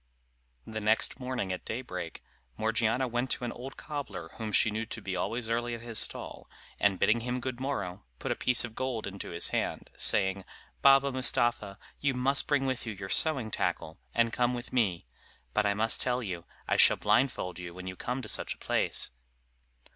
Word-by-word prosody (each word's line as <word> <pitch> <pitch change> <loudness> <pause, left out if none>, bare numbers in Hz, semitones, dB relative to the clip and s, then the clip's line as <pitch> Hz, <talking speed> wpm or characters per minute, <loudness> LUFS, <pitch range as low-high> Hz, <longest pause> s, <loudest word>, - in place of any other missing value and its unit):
The 110 0 -5
next 110 +1 +2
morning 125 -7 -2
at 90 - -6
daybreak, 90 -8 -5 0.3
Morgiana 115 +3 +1
went 120 +2 -1
to - - -2
an 120 - -2
old 130 +3 -8
cobbler 105 - -5
whom 110 +3 -5
she 110 +1 +4
knew 110 +1 -3
to 110 - -5
be 95 -3 -4
always 115 +4 -2
early 120 +1 0
at 115 - -9
his 115 -2 0
stall, - - -2 0.3
and 100 -2 +3
bidding 110 +5 +3
him 125 +2 -2
good 130 -1 -4
morrow, 115 -10 -3
put - - -3
a - - +1
piece 125 -1 +3
of 115 - -9
gold 130 -2 -2
into 100 0 -6
his 85 - -2
hand, - - -2
saying, 95 -1 +3 0.4
"Baba 135 0 +6
Mustapha, 120 -5 +1 0.2
you 140 -2 +1
must 135 +2 +3
bring 145 -2 +2
with 130 -2 -2
you 110 - -2
your 95 -1 -7
sewing 135 -7 +4
tackle, - - -2
and 115 -1 +2
come 125 0 +2
with 120 +1 -7
me; 100 - +1 0.5
but 105 - +2
I 100 - +2
must 110 +2 +1
tell 125 0 0
you, 90 -5 -5 0.2
I - - +2
shall - - +7
blindfold 115 -8 +1
you 85 -1 -6
when 90 0 -8
you 95 0 -5
come 125 +6 -3
to - - -7
such - - 0
a - - -27
place." - - 0
115 Hz, 195 wpm, -30 LUFS, 100-125 Hz, 0.5 s, shall